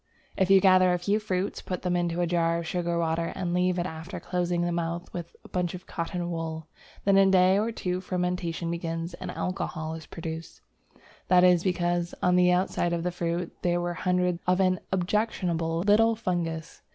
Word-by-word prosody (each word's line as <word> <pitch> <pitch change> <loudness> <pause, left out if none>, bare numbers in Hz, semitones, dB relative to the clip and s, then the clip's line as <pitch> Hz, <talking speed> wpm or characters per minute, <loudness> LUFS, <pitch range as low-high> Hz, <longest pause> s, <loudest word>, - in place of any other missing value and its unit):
If 190 -1 +1
you 195 0 +8
gather 185 -1 +5
a - - +2
few 200 +5 0
fruits, 190 -2 -2
put 180 - -5
them 180 -1 0
into 175 0 0
a - - +2
jar 170 -1 +1
of 170 - -4
sugar 170 0 -1
water, 165 0 0
and 180 -2 -2
leave 180 0 +2
it 175 - 0
after 170 +2 -6
closing 175 0 -1
the 175 - 0
mouth 170 +1 -3
with 170 -1 -6
a - - -12
bunch 180 -1 -2
of 180 - -10
cotton 175 +1 -3
wool, 160 -1 -4 0.4
then 195 0 +5
in 195 - +6
a - - +2
day 185 +1 +5
or 220 +2 0
two 180 -4 -3
fermentation 180 -2 -2
begins 165 0 -3
and 170 - -7
alcohol 160 -3 -3
is 160 0 -8
produced. 165 -1 -7 0.7
That 180 0 +5
is 180 -2 +5
because, 175 -2 0
on 180 0 +3
the 180 0 +5
outside 180 -1 +1
of 170 -1 -1
the 180 - -1
fruit, 170 0 -3
there 175 -1 +1
were 175 0 -2
hundreds 180 -1 0
of 180 +1 +3
an 185 -1 +3
objectionable 175 -4 0
little 220 +4 +4
fungus. 170 -6 -3
175 Hz, 200 wpm, -27 LUFS, 170-185 Hz, 0.7 s, you